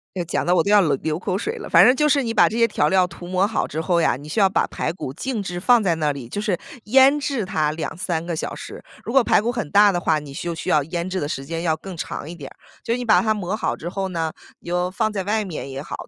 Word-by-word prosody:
这 180 - -2
讲 170 - -2
得 180 +1 +2
我 165 - +4
都 - - -2
要 210 - +7
流 155 -7 +2
流 155 +3 -3
口 190 0 -2
水 - - -3
了。 - - -8
反 175 +3 +7
正 250 - +6
就 300 +2 +2
是 280 -1 +3
你 225 -1 -2
把 - - +5
这 225 - -4
些 230 - +5
调 - - +1
料 190 -2 +3
涂 175 0 -11
抹 185 +2 +2
好 220 - -1
之 155 - -4
后 170 +1 +1
呀， 140 - +2
你 145 +3 -11
需 180 - -1
要 195 - +6
把 190 - +1
排 - - -3
骨 150 -7 -6
静 240 - -3
置 175 -2 -5
放 240 +5 +5
在 180 -4 +2
那 150 -2 0
里， 135 -4 -8
就 205 - -4
是 205 -5 -1 0.3
腌 265 +5 +5
制 275 -6 -2
它 160 -6 0
2-3 165 +1 -3
个 170 - -2
小 155 - -4
时。 - - -9 0.2
如 - - -4
果 270 0 +5
排 220 - +3
骨 235 +3 -1
很 235 - -4
大 205 +2 +6
的 175 - -1
话， 160 -2 +1
你 145 -2 -9
就 170 +4 -4
需 160 - -7
要 150 - +3
腌 170 +4 -4
制 185 0 -2
的 145 - -3
时 135 - -4
间 165 +3 -4
要 160 -2 +1
更 185 +3 -9
长 160 - -5
一 170 - -7
点 145 -6 -9
儿。 - - -19 0.3
就 230 - -2
是 240 - 0
你 250 - -4
把 195 -6 +5
它 220 +1 +2
抹 200 -2 -3
好 - - -2
之 170 - -6
后 190 +1 -3
呢， 165 -3 -2 0.3
你 - - -21
就 180 +1 -1
放 215 +3 -1
在 200 -2 -2
外 210 +3 0
面 160 -7 -6
也 135 0 -5
好， 145 - -7
180 Hz, 330 characters per minute, -22 LUFS, 160-210 Hz, 0.3 s, 要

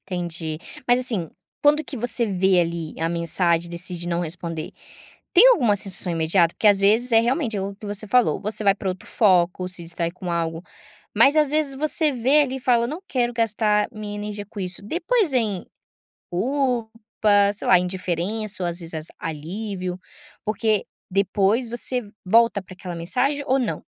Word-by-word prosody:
Entendi, 170 -4 -4 0.3
mas 245 0 +4
assim, 220 -10 0 0.3
quando 300 +1 +4
que 275 - -7
você 235 0 +2
vê, 190 -2 +2
ali, 170 -2 -3
a 165 - 0
mensagem 170 0 0
e - - -10
decide 175 0 -3
não 170 0 -1
responder. 165 -1 -4 0.6
Tem 400 +7 +8
alguma 245 - +4
sensação 190 -2 +2
imediata? 165 +1 +2
Porque - - -1
às 200 -2 +6
vezes, 225 +5 +3
é 225 - +6
realmente 240 -1 0
é - - -2
o 200 +1 -5
que 210 +2 -11
você 205 +1 -1
falou, 245 +3 +2
você 215 +1 +1
vai 195 -1 +5
pra 195 - -5
outro 185 0 -6
foco, 180 -3 +2
se 185 -1 -4
distrai 170 0 -3
com 180 0 -7
algo, 165 -1 -2 0.5
mas 285 +3 +5
às 300 -2 +3
vezes 300 -2 +1
você 305 +2 +2
vê, 265 +4 +3
ali, 265 -2 -3
e - - -7
fala 240 -2 +2
eu - - -3
não 315 +7 -6
quero 245 -2 0
gastar 215 -2 +1
minha 210 -1 -7
energia 205 0 -6
com 210 - -8
isso. 180 0 -3
Depois 355 - 0
vem 215 -7 -1 0.6
culpa, 245 +3 -1 0.6
sei 205 - -6
lá, 180 - +6
indiferença 185 +3 -3
ou 175 - 0
às 170 +1 -5
vezes 165 -1 -6
as 155 0 -6
alívio, 180 +4 -5 0.5
porque 215 -1 0 0.2
depois 200 +5 +1
você 245 +1 +1 0.2
volta 230 +1 +3
pra 185 0 -13
aquela 180 -3 -7
mensagem 250 +13 -1
ou 265 - +3
não? 250 - -3
205 Hz, 185 wpm, -22 LUFS, 175-240 Hz, 0.6 s, Tem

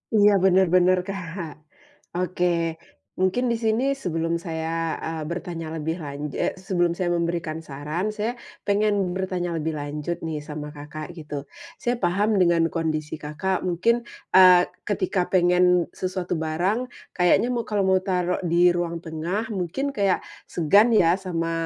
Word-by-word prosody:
Iya 205 0 +6
bener 190 0 +5
bener 185 0 +5
Kak, 170 -4 -5 0.6
oke, 180 0 0 0.7
mungkin 190 +7 +2
di 235 - +1
sini 220 +3 +2 0.2
sebelum 165 -1 -1
saya, 160 0 -3 0.4
eee, 160 -1 -4
bertanya 170 -1 -5
lebih 160 +2 -2
lan 140 -2 -6
eee, - - -1
sebelum 180 -2 0
saya 180 -2 0
memberikan 170 -2 -1
saran 150 +7 -3
saya 220 +3 -1 0.3
pengen 205 +1 +2 0.2
bertanya 185 -2 -2
lebih 160 0 -2
lanjut 150 +3 -4
nih 155 -2 -3
sama 150 0 -6
Kakak 155 +3 -7
gitu. 150 -4 -6 0.3
Saya 245 -1 0
paham 195 +4 +2
dengan 170 -1 +4
kondisi 155 -2 -2
Kakak 155 +6 -2
mungkin, 185 +7 +1 0.3
eee, 180 -1 +8 0.2
ketika 190 -1 0
pengen 180 -1 +4
sesuatu 185 -1 -3
barang 190 +11 0 0.2
kayaknya 190 +7 +3
mau 240 - 0
kalo 205 -2 +1
mau 190 0 +3
taruh 180 -2 0
di 175 0 +4
ruang 175 -1 -2
tengah 170 +7 -2
mungkin 185 - -2
kayak 200 -4 +1 0.2
segan 200 +8 +4
ya 185 -4 +4
sama, 165 -3 -2
175 Hz, 145 wpm, -24 LUFS, 165-190 Hz, 0.7 s, eee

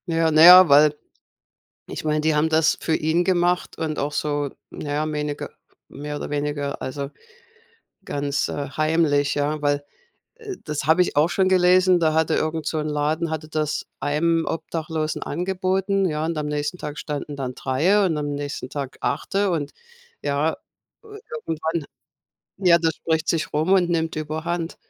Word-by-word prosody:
Ja, 165 -1 +1
na 155 0 +5
ja, 180 +1 +10
weil 150 +1 +6 0.9
ich - - -7
meine, 155 0 +1
die 155 0 +1
haben 150 +1 +3
das 160 0 +3
für 160 - 0
ihn 160 +3 +1
gemacht 180 -1 0
und 155 -2 -3
auch 145 +1 -1
so, 145 -2 -2 0.2
na 145 - -6
ja, 155 +1 -1
weniger 150 -1 -3 0.4
mehr 150 +1 -7
oder - - -6
weniger 145 -1 -3
also, 140 +1 -4 0.9
ganz, 140 0 -2
äh, 140 -2 -4
heimlich, 155 -1 +1
ja. 145 +1 -1
Weil, 145 0 0 0.5
äh, 435 -5 -7
das 150 -2 -4
habe 160 +4 +4
ich 180 - 0
auch 150 +3 +4
schon 190 +1 +1
gelesen, 185 0 +4
da 160 -2 +2
hatte 160 0 +2
irgend 155 -1 -2
so 160 - -1
'n 155 0 -2
Laden 155 +2 -1
hatte 155 -1 -4
das 155 -1 -2
einem 165 +3 +1
Obdachlosen 160 -1 -3
angeboten, 190 +3 -1
ja, 155 -2 -2
und 165 0 -2
am 150 - -2
nächsten 150 +3 -2
Tag 150 -3 -6
standen 150 -1 -5
dann 130 -2 -5
3 175 +11 +2
und 170 -4 0
am 145 -1 -2
nächsten 145 -2 -5
Tag 135 -2 -5
8 135 +5 -3
und, 180 -8 0 0.5
ja, 145 +2 0 0.5
äh, - - -17 0.4
irgendwann 160 0 -2 0.8
Ja, 170 -2 +6
das 165 -1 0
spricht 160 -1 -1
sich 165 -2 0
rum 155 +5 +1
und 185 -3 +4
nimmt 165 -1 0
überhand. 160 +2 -3
155 Hz, 170 wpm, -23 LUFS, 145-170 Hz, 0.9 s, ja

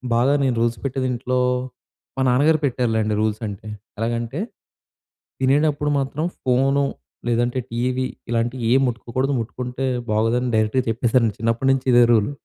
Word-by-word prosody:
బాగా 125 +4 +3
నేను 130 -3 +1
రూల్స్ 120 0 +1
పెట్టేది 130 -1 -1
ఇంట్లో 125 +1 -1 0.8
మా - - 0
నాన్నగారు 150 +6 +3
పెట్టారులేండి 115 -4 0
రూల్స్ 110 +1 -1
అంటే, 100 +1 -8 0.3
ఎలాగంటే 115 +4 -2 1.0
తినేటప్పుడు 145 +2 +2
మాత్రం 140 +3 -2 0.2
ఫోను, 135 +2 +2 0.4
లేదంటే 120 +2 +1
టీవీ, 125 +2 -1 0.2
ఇలాంటియేం 120 +2 +1
ముట్టుకోకూడదు. 125 +3 -2
ముట్టుకుంటే 125 +3 -4 0.3
బాగోదని 115 +4 +1
డైరెక్‌గా 110 +4 +2
చెప్పేసారండి. 115 0 +2
చిన్నప్పటినుంచి 125 +4 +1
ఇదే 120 0 +7
రూలు. 110 +2 +2
125 Hz, 120 wpm, -22 LUFS, 115-135 Hz, 1.0 s, ఇదే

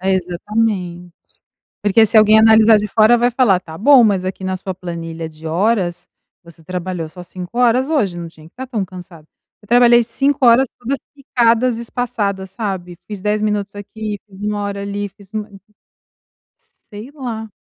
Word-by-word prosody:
é 190 +1 0
exatamente, 180 -1 -2 0.7
porque 215 +2 +4
se 225 - +2
alguém 215 0 +7
analisar 220 0 +6
de 210 - -2
fora, 220 +3 +4
vai 240 +1 +2
falar: 230 -7 +3
"Tá 160 -3 -11
bom, 265 - +6
mas 200 -5 +2
aqui 185 0 -5
na 185 0 -2
sua 190 0 -6
planilha 165 -2 -6
de 155 +1 -12
horas 180 +1 0 0.3
você 170 -1 -17
trabalhou 180 -1 -4
só 180 +2 -11
5 180 +5 -8
horas 250 +3 +2
hoje 210 - 0
não 170 -1 -6
tinha 155 -1 -17
que 165 - -19
estar 260 +1 -7
tão 225 -6 -2
cansada", 175 -3 -12 0.3
eu 205 - -21
trabalhei 240 0 +6
5 270 +3 0
horas, 240 +3 +6
todas 260 +3 -3 0.2
picadas 240 -3 +1
e - - -5
espaçadas, 210 -6 -3
sabe, 190 -4 -5
fiz 205 -2 -7
10 210 +2 -1
minutos 210 -1 -2
aqui, 210 +1 -6
fiz 195 -2 -16
1 205 0 -2
hora 200 0 -4
ali, 200 0 -4
fiz 195 0 -20
1 215 0 -3 1.4
Sei 215 +4 -9
lá. 230 -6 -6
205 Hz, 175 wpm, -18 LUFS, 185-230 Hz, 1.4 s, alguém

